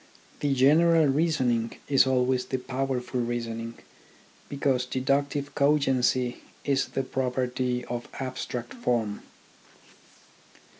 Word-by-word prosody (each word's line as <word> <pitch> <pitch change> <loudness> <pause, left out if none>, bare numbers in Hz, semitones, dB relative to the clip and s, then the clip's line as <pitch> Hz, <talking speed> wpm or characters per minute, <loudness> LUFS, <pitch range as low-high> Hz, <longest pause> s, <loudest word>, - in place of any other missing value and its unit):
The 145 -2 +1
general 160 +5 +5
reasoning 135 -6 +1
is 135 -2 +4
always 125 -1 +2
the 130 - -2
powerful 130 -1 -2
reasoning, 115 -1 -3 0.7
because 135 -3 0
deduc 140 +3 +1
tive 145 -1 -4
cogency 135 -4 +2 0.3
is 140 -1 +1
the 135 - -2
property. 125 -1 -1
of 120 0 -5
abstract 130 -2 -4
form. 115 - -1
130 Hz, 100 wpm, -27 LUFS, 125-140 Hz, 0.7 s, general